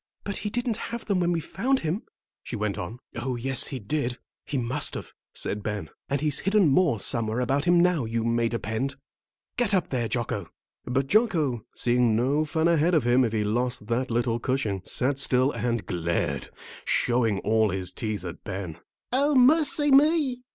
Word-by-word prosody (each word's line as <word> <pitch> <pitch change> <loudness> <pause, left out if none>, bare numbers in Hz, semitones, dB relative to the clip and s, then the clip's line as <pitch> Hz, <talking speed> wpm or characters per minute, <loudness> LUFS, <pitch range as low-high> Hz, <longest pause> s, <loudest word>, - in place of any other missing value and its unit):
"But 200 - -4
he 210 - -3
didn't 235 0 -1
have 235 0 -5
them 200 -4 +1
when 175 -1 +1
we 170 - +1
found 255 - -1
him," 165 +7 -2 0.4
she - - -6
went 105 -2 -1
on. 100 +6 -5 0.2
"Oh, 125 +2 -2
yes, 130 +2 0
he 135 - -4
did; 125 +2 -2 0.3
he 145 - -2
must 130 +4 +1
have," - - -7 0.2
said 105 - -1
Ben; 105 -6 -4 0.2
"and 140 0 0
he's 150 -3 +1
hidden 195 -3 +3
more 140 - +3
somewhere 115 0 +1
about 135 +3 0
him 175 0 +5
now, 175 -7 +3
you 115 0 -2
may 115 0 +1
depend. 115 +4 -3 0.6
Get 230 -5 +2
up 185 - 0
there, 120 -3 -1
Jocko!" 110 -6 -3 0.4
But 130 +2 0
Jocko, 155 - +1
seeing 120 -2 +2
no 140 +7 +1
fun 160 +2 +1
ahead 170 +1 +3
of 155 - +3
him 125 +2 +4
if 115 - 0
he 110 -1 0
lost 120 +2 -1
that 125 +3 0
little 120 0 0
cushion, 115 -7 -1
sat 135 +2 0
still 130 0 +3
and 120 -7 -2
glared, 85 -2 -2 0.3
showing 120 -4 +1
all 110 0 +2
his 95 -1 -2
teeth 105 -5 -4
at 90 -1 -7
Ben. 95 -5 -6 0.3
"O 285 +3 +3
mercy 290 +2 +4
me!" 280 -2 +4
130 Hz, 185 wpm, -26 LUFS, 115-175 Hz, 0.6 s, him